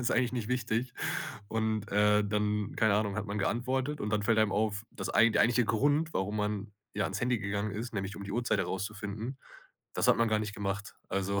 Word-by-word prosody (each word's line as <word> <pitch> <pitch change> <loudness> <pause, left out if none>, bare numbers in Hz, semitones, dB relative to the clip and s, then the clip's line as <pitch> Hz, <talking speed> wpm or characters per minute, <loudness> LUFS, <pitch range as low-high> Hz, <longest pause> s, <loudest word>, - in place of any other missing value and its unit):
es - - -3
ist - - +1
eigentlich 125 0 +2
nicht 120 -3 -3
wichtig. 125 0 0 0.6
Und, 110 -1 -1
äh, 105 +1 +4
dann, 105 0 0
keine 110 -2 +4
Ahnung, 105 -1 0
hat 105 -1 -2
man 100 +1 -3
geantwortet 130 +7 0
und 105 - -2
dann 105 -1 +1
fällt 110 +1 +3
einem 110 -2 +3
auf, 105 0 0
das 95 0 -5
ei 115 - +7
der - - +4
eigentliche 120 +1 +3
Grund, 145 +9 +2
warum 100 +3 -1
man, 105 0 -2 0.2
ja, 105 -1 0
ans 95 - -2
Handy 120 -1 +1
gegangen 100 +1 -2
ist, 115 +4 -5
nämlich 95 -1 -3
um 100 - -6
die 100 - -5
Uhrzeit 120 -4 +1
rauszufinden, 105 +6 -4 0.6
das - - +2
hat - - +6
man 115 -1 +3
gar 110 0 +2
nicht 105 -1 -3
gemacht. 100 0 -3
Also 100 +1 0
105 Hz, 220 wpm, -31 LUFS, 100-115 Hz, 0.6 s, ei